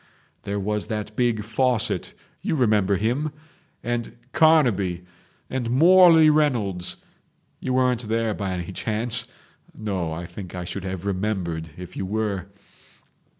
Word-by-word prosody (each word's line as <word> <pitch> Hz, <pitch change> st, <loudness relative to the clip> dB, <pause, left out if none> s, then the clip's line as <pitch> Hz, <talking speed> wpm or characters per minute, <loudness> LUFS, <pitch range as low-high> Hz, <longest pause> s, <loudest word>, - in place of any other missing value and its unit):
There 100 Hz, 0 st, -2 dB
was 105 Hz, +1 st, -2 dB
that 105 Hz, -1 st, -4 dB
big 120 Hz, -3 st, +1 dB
Fawcett—you 115 Hz, +6 st, -1 dB
remember 105 Hz, -7 st, +3 dB
him?—and 145 Hz, -, -4 dB, 0.2 s
Carnaby 110 Hz, -, +3 dB, 0.4 s
and 125 Hz, -3 st, -3 dB
Morley 165 Hz, +3 st, +7 dB
Reynolds. 120 Hz, -13 st, +1 dB, 0.6 s
You 130 Hz, -, -2 dB
weren't 125 Hz, -3 st, +1 dB
there 115 Hz, -1 st, +1 dB
by 95 Hz, -2 st, -3 dB
any 90 Hz, 0 st, -4 dB
chance? 110 Hz, +4 st, 0 dB, 0.5 s
No, 95 Hz, -6 st, -2 dB
I 85 Hz, +2 st, -5 dB
think 90 Hz, +1 st, -9 dB
I 90 Hz, -, -4 dB
should 95 Hz, +2 st, -5 dB
have 95 Hz, 0 st, -5 dB
remembered 90 Hz, -5 st, -2 dB
if 90 Hz, -1 st, -9 dB
you 95 Hz, -, -3 dB
were 100 Hz, -3 st, -2 dB
110 Hz, 120 wpm, -24 LUFS, 95-125 Hz, 0.6 s, Morley